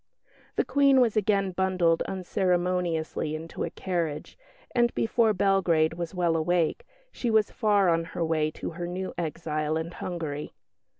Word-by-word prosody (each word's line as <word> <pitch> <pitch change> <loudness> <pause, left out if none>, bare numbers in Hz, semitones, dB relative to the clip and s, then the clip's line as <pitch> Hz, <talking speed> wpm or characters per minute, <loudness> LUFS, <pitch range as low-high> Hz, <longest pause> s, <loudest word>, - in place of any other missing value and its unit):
The - - +1
Queen 275 0 +4
was 235 -4 +3
again 200 -2 +2
bundled 180 -3 +1
unceremoniously 180 -4 -1
into 160 +1 -5
a - - -2
carriage, 170 -5 -3 0.4
and 240 -1 +3
before 225 0 +2
Belgrade 185 -5 +2
was 170 +1 -5
well 175 -2 +1
awake, 170 - 0 0.2
she 240 - -3
was 220 -2 +3
far 205 -4 +2
on 165 -1 +2
her 165 0 -3
way 155 -1 +1
to 155 - -6
her 175 +1 -5
new 185 +2 -4
exile 155 -2 -2
in 160 +1 -4
Hungary. 160 -5 -5
175 Hz, 145 wpm, -27 LUFS, 165-195 Hz, 0.4 s, Queen